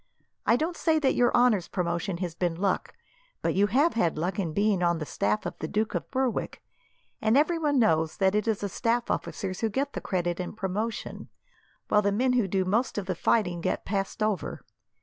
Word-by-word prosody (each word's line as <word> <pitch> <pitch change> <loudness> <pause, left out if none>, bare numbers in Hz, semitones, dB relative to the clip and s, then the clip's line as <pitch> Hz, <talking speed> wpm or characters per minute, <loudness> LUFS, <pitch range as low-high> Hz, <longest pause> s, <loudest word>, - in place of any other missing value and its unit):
I 230 - +6
don't 320 +6 -1
say 320 -1 +2
that 280 -4 +2
your 245 0 +3
honour's 235 -7 +3
promotion 175 +1 -2
has 170 - -6
been 175 -1 -1
luck, 190 +2 -1 0.5
but - - +1
you 200 +2 +3
have 280 - +3
had 170 -9 +1
luck 175 +5 -2
in 175 -5 -1
being 200 +1 +1
on 170 -1 +2
the 155 - -4
staff 105 -6 -1
of - - -3
the 155 - -3
Duke 215 +4 -1
of - - -3
Berwick, 260 -3 -2 0.6
and 220 +3 +3
everyone 305 -1 +2
knows 160 -9 +2
that 190 -1 +3
it 210 +2 0
is 220 -3 0
the 205 - -1
staff 235 +4 0
officers 185 -3 -3
who 225 - 0
get 275 +6 -2
the - - -4
credit 175 -2 -1
and 180 +4 -5
promotion, 210 +4 -4 0.6
while 210 - +4
the 200 0 +1
men 250 +5 +2
who 240 -5 +2
do 190 0 0
most 220 +7 0
of 205 - -2
the 185 - -1
fighting 180 -1 +1
get - - -2
passed 195 +1 -2
over. 205 -7 -2
205 Hz, 210 wpm, -27 LUFS, 180-235 Hz, 0.6 s, I